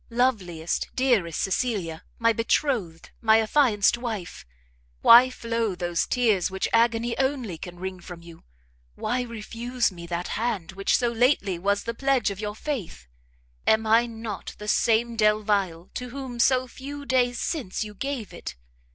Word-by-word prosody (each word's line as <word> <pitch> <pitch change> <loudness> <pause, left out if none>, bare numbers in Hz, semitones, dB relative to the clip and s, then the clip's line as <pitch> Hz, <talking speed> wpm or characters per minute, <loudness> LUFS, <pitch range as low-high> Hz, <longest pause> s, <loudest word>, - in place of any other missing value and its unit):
loveliest, 200 -10 -1
dearest 230 - +1
Cecilia, 195 -6 -1 0.2
my 230 0 +3
betrothed, 225 - -1
my 220 -1 +5
affianced 225 -2 +3
wife! 215 - -5 0.6
why 245 +2 +9
flow 230 -5 -2
those 175 -1 -1
tears 220 -8 +2
which 190 0 -2
agony 235 0 +2
only 265 -8 -1
can 175 +2 -9
wring 185 0 -5
from 175 -1 -10
you? 170 -1 -14 0.5
Why 245 +4 -1
refuse 235 +1 -2
me 170 -2 -10
that 175 +1 -3
hand 220 -8 -2
which 195 +1 +1
so 240 -2 +1
lately 225 -7 +2
was 200 +2 0
the 230 - -3
pledge 265 -3 +1
of 195 - -7
your 210 -1 -4
faith? 220 - -5 0.6
Am 220 0 +4
I 230 +2 +4
not 225 -3 -7
the 210 - -8
same 230 +2 +2
Delvile 205 -5 +1
to 250 0 -5
whom 255 -2 -7
so 255 +1 +3
few 285 +3 -8
days 245 -2 +1
since 250 - -2
you 210 -1 -8
gave 255 -1 -4
it? - - -7
225 Hz, 150 wpm, -25 LUFS, 190-245 Hz, 0.6 s, why